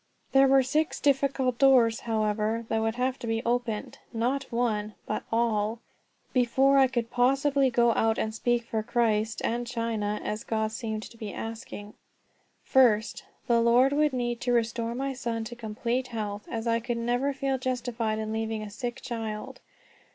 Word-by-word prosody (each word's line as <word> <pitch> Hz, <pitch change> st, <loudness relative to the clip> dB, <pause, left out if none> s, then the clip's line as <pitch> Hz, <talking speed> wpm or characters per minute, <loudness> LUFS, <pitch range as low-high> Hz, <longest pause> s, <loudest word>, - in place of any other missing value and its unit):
There 270 Hz, 0 st, +6 dB
were 270 Hz, 0 st, +5 dB
six 305 Hz, +5 st, 0 dB
difficult 270 Hz, -3 st, +1 dB
doors, 250 Hz, -5 st, +5 dB
however, 220 Hz, 0 st, -1 dB
that 225 Hz, 0 st, +1 dB
would 225 Hz, 0 st, 0 dB
have 255 Hz, +1 st, -1 dB
to 235 Hz, -, -6 dB
be 225 Hz, 0 st, -1 dB
opened 235 Hz, -3 st, -2 dB
not 255 Hz, +4 st, -1 dB
one, 215 Hz, -3 st, -1 dB
but -, -, -2 dB
all 225 Hz, -1 st, +1 dB, 0.6 s
before 265 Hz, +2 st, +4 dB
I 265 Hz, -, +6 dB
could 240 Hz, -2 st, -3 dB
possibly 270 Hz, +2 st, +3 dB
go 235 Hz, -1 st, +3 dB
out 225 Hz, 0 st, +1 dB
and 220 Hz, -, -1 dB
speak 240 Hz, +1 st, 0 dB
for 225 Hz, -1 st, -2 dB
Christ 220 Hz, -1 st, 0 dB
and 240 Hz, +1 st, -1 dB
China, 225 Hz, -3 st, -2 dB
as 210 Hz, +2 st, -3 dB
God 220 Hz, -1 st, -1 dB
seemed 220 Hz, -2 st, -4 dB
to 230 Hz, -, -12 dB
be 215 Hz, -3 st, -6 dB
asking. 220 Hz, -2 st, -7 dB, 0.7 s
First, 230 Hz, -4 st, +3 dB, 0.2 s
the 235 Hz, -1 st, +3 dB
Lord 245 Hz, +4 st, +4 dB
would 300 Hz, 0 st, +3 dB
need 240 Hz, -2 st, -2 dB
to 245 Hz, -, 0 dB
restore 230 Hz, 0 st, 0 dB
my 270 Hz, +1 st, -2 dB
son 235 Hz, -3 st, -3 dB
to 240 Hz, +2 st, -7 dB
complete 235 Hz, +3 st, -2 dB
health, 210 Hz, -3 st, -5 dB
as 225 Hz, 0 st, -4 dB
I 230 Hz, 0 st, +2 dB
could 240 Hz, +1 st, -3 dB
never 245 Hz, +4 st, 0 dB
feel 270 Hz, -1 st, -1 dB
justified 240 Hz, -3 st, -2 dB
in 220 Hz, 0 st, -3 dB
leaving 220 Hz, -1 st, -2 dB
a 210 Hz, -, -8 dB
sick 240 Hz, +3 st, -5 dB
child. 220 Hz, -3 st, -5 dB
235 Hz, 170 wpm, -27 LUFS, 220-255 Hz, 0.7 s, There